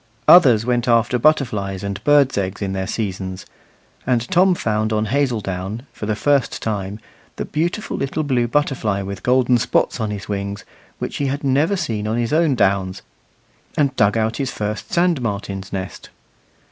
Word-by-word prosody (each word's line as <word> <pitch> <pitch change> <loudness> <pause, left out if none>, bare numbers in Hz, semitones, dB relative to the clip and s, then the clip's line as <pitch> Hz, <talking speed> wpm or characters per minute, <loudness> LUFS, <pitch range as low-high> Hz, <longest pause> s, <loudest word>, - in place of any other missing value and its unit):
Others 125 -11 +7
went 120 0 0
after 120 +1 +3
butterflies 105 -10 +1
and 100 +1 -4
birds' 145 -2 +4
eggs 100 +1 -2
in 95 -1 -2
their 95 -1 -3
seasons; 95 -3 -4 0.6
and 120 -2 +1
Tom 185 0 +4
found 110 -5 -1
on 110 0 +1
Hazeldown, 110 -4 -2
for 105 - -6
the 110 - 0
first 140 +3 +1
time, 100 -1 -3 0.4
the - - -4
beautiful 170 +8 -2
little 135 +3 -2
blue 125 -5 +1
butterfly 120 -7 0
with 100 0 -6
golden 125 -1 +3
spots 125 +1 0
on 110 -2 -1
his 105 -1 -6
wings, 100 0 -4 0.3
which - - -4
he 140 - -1
had 140 +2 -3
never 145 +8 +2
seen 115 - -2
on 110 +2 -1
his 120 +3 -1
own 155 -3 +3
downs, 95 -4 0 0.7
and 140 -2 +2
dug 105 -1 +3
out 110 0 0
his 135 -3 -2
first 105 0 -4
sand 170 -5 +2
martin's 100 -3 -4
nest. 95 -1 -6
115 Hz, 170 wpm, -20 LUFS, 100-135 Hz, 0.7 s, Others